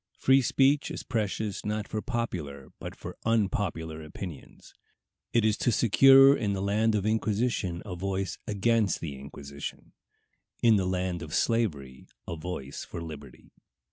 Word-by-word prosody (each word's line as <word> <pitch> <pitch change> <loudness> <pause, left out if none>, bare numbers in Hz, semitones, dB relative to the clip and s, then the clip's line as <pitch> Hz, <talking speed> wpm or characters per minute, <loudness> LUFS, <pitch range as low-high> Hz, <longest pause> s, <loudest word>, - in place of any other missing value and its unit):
Free 135 +1 +4
speech 135 +3 +2
is - - -6
precious 110 -3 -2
not 105 0 -2
for 110 - -3
popular 85 - -4
but - - -7
for - - -9
unpopular 95 -7 -1
opinions. 80 0 -9 0.6
It 115 -2 +3
is 110 -1 +2
to 120 - +1
secure 135 +5 +7
in 105 -6 -1
the 95 - -2
land 105 +2 +2
of 105 - 0
the 105 - +1
Inquisition 105 -5 -1
a 90 - -5
voice 95 0 -3
against 105 0 +1
the 75 -4 -5
inquisition; 70 +1 -8 0.7
in 115 -2 +6
the 95 -2 0
land 90 -1 -2
of 80 -2 -5
slavery, 75 - -1 0.2
a 85 - -4
voice 80 -5 -6
for - - -7
liberty. 75 -5 -10
100 Hz, 150 wpm, -28 LUFS, 80-110 Hz, 0.7 s, secure